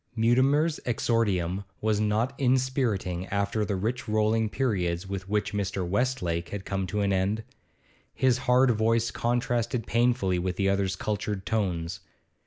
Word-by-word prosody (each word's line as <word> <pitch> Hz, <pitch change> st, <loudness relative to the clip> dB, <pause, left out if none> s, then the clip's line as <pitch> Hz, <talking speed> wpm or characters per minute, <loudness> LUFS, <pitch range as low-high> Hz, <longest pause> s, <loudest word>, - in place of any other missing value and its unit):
Mutimer's 135 Hz, +7 st, +3 dB
exordium 100 Hz, -6 st, 0 dB, 0.2 s
was 110 Hz, -1 st, +1 dB
not 110 Hz, +4 st, +1 dB
inspiriting 125 Hz, -9 st, 0 dB
after 100 Hz, +2 st, 0 dB
the 100 Hz, -1 st, -1 dB
rich 115 Hz, +7 st, -2 dB
rolling 110 Hz, +1 st, +2 dB
periods 95 Hz, -9 st, -1 dB
with 95 Hz, 0 st, -5 dB
which 105 Hz, 0 st, 0 dB
Mr. 95 Hz, -2 st, -2 dB
Westlake 90 Hz, -6 st, -1 dB
had 100 Hz, -1 st, -6 dB
come 95 Hz, -1 st, -2 dB
to 105 Hz, +4 st, -1 dB
an 100 Hz, -1 st, +1 dB
end; 100 Hz, +4 st, 0 dB, 0.7 s
his 130 Hz, -1 st, +2 dB
hard 125 Hz, +1 st, +5 dB
voice 115 Hz, +1 st, +1 dB
contrasted 120 Hz, -1 st, -1 dB
painfully 115 Hz, -6 st, +1 dB
with 90 Hz, 0 st, -2 dB
the 95 Hz, +1 st, +1 dB
other's 100 Hz, -1 st, 0 dB
cultured 105 Hz, -1 st, -3 dB
tones. 90 Hz, -5 st, -1 dB
105 Hz, 140 wpm, -27 LUFS, 95-120 Hz, 0.7 s, hard